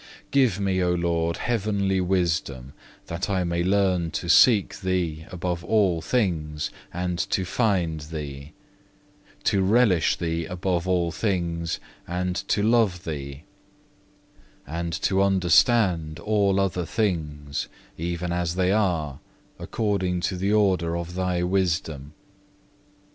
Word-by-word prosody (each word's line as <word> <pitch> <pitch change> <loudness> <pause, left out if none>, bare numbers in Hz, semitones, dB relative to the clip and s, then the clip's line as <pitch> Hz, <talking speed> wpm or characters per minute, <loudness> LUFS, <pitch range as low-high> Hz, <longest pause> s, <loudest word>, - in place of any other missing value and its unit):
5. - - -19 0.2
Give 130 -9 +3
me, 95 -2 0
O 90 0 +2
Lord, 85 -1 0
heavenly 100 -4 0
wisdom, 80 -8 -1 0.3
that 85 +4 -4
I 95 -2 +1
may 85 0 -1
learn 95 -3 +2
to - - -6
seek 110 -7 +5
Thee 90 -5 -2
above 90 -1 -3
all 95 -5 +2
things 80 -11 -1 0.2
and 90 0 -3
to 95 - 0
find 90 -7 0
Thee; 75 -2 -7 0.9
to 100 - +2
relish 100 -4 +3
Thee 85 -1 -2
above 90 0 -2
all 90 -2 +1
things 85 -3 -2 0.3
and 90 +1 -2
to 100 - +1
love 110 -6 +2
Thee; 70 -3 -6 1.2
and 85 +3 -4
to 95 0 +2
understand 90 -3 +3
all 100 0 +2
other 90 -3 -1
things, 75 -9 -2 0.3
even 85 +1 -3
as 85 -1 -1
they 95 0 +2
are, 85 -9 0 0.4
according 95 -5 -1
to 95 - -1
the 95 +3 -1
order 95 -6 +2
of 85 0 -5
Thy 90 -1 -1
wisdom. 85 -6 -1
90 Hz, 125 wpm, -25 LUFS, 85-95 Hz, 1.2 s, seek